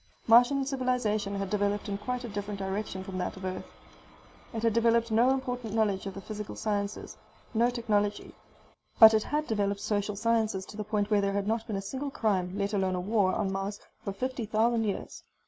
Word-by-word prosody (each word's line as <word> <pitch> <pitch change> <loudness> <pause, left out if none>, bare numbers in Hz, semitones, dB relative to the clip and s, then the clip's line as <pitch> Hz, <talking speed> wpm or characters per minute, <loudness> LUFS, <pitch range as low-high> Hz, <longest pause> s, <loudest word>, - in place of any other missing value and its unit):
Martian 245 +4 +5
civilization 250 -7 0
had 195 -1 -3
developed 205 +1 0
in 200 - -2
a - - -2
quite 250 +3 -3
different 205 0 -4
direction 190 0 -3
from 190 -1 -5
that 180 - -3
of 190 - -7
Earth. 185 0 -4 0.8
It 225 0 -4
had 230 -2 +3
developed 230 0 +3
no 235 +3 +4
important 250 -4 -2
knowledge 205 -3 +1
of 195 - -6
the 195 - -6
physical 210 0 -6
sciences, 205 -1 -3 0.4
no 235 +2 +3
technology. 210 -4 -1 0.6
But 220 -1 +10
it 220 - +4
had 300 +6 -1
developed 200 -4 0
social 205 0 -1
sciences 220 -3 +1
to - - -11
the 210 - -2
point 210 0 -1
where 205 -1 +4
there 200 0 0
had 200 0 -1
not 225 +1 -1
been 215 - -3
a 195 - -3
single 265 +8 -4
crime, 195 -7 0
let 200 +1 -1
alone 190 -2 +1
a - - -1
war, 200 0 +2
on 190 - -1
Mars 195 +1 -3 0.2
for 200 - -3
fifty 245 +3 -3
thousand 225 +1 +2
years. 200 - -4
210 Hz, 200 wpm, -29 LUFS, 200-230 Hz, 0.8 s, But